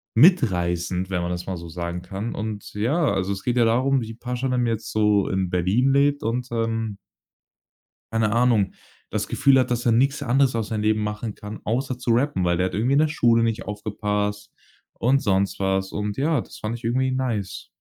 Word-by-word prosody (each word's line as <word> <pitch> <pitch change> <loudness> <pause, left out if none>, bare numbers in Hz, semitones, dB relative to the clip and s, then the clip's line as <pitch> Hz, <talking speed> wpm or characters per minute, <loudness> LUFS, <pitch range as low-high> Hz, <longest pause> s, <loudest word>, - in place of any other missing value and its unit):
mitreißend, 95 - +3
wenn 90 -2 -1
man 85 0 -2
das 90 0 -5
mal 95 -2 -3
so 85 0 -8
sagen 85 +1 -5
kann. 95 +5 -5
Und 105 -1 -5
ja, 140 +10 +1
also 95 +1 -1
es 95 - -7
geht 125 0 0
ja 120 - +5
darum, 130 +4 +2
wie 115 -1 -6
„Pashanim“ 125 +1 -2
jetzt 115 -1 -2
so 105 -2 +3
in 95 -1 -1
Berlin 95 +10 +2
lebt 140 +1 +2
und, 120 +3 -1
ähm 115 -2 -2 1.2
keine 110 -2 +1
Ahnung, 115 -5 +2 0.4
das - - -2
Gefühl 135 -1 +4
hat, 130 - +1
dass 120 0 -1
er 120 - +4
nix 135 +5 +2
anderes 130 -1 +2
aus 110 -3 -2
seinem 110 -2 -2
Leben 110 0 +2
machen 105 +1 -4
kann, 105 +1 -8
außer 125 +3 -1
zu 125 -1 -1
rappen, 120 -5 +1
weil 85 0 +1
er 95 0 0
irgendwie 115 +8 +1
in 140 - +4
der 155 - +4
Schule 115 -6 +3
nicht 115 0 -1
aufgepasst 105 -1 -3 0.4
und 135 +3 +2
sonst 100 -1 0
was. 95 0 0
Und 105 0 -3
ja, 150 0 +1
das - - -12
fand 115 +2 -3
ich - - -17
irgendwie 130 +3 +1
nice. 120 -7 -3
110 Hz, 200 wpm, -23 LUFS, 100-125 Hz, 1.2 s, ja